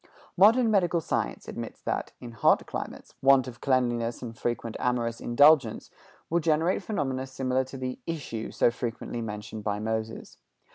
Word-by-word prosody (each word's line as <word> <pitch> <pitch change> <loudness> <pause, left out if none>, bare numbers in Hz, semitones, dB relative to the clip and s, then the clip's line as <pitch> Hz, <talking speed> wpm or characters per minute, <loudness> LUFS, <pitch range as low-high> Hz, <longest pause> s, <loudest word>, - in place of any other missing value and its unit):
Modern 225 +5 +6
medical 175 -4 +3
science 160 - -2
admits - - -6
that, - - -2
in 120 - -8
hot 115 - +3
climates, - - -7
want 135 -1 +5
of 120 0 -9
cleanliness 120 -3 0
and 115 -2 -6
frequent 115 0 -3
amorous 120 -2 -1
indulgence 140 -1 +4 0.4
will 170 - +1
generate 160 +2 +1
phenomena 135 -10 -2
similar 130 0 0
to 135 - -9
the 130 -1 -4
"issue" 140 -9 -4
so - - +2
frequently 120 0 -4
mentioned 105 -1 -6
by 105 -1 -1
Moses. 110 +1 -4
125 Hz, 150 wpm, -27 LUFS, 115-145 Hz, 0.4 s, Modern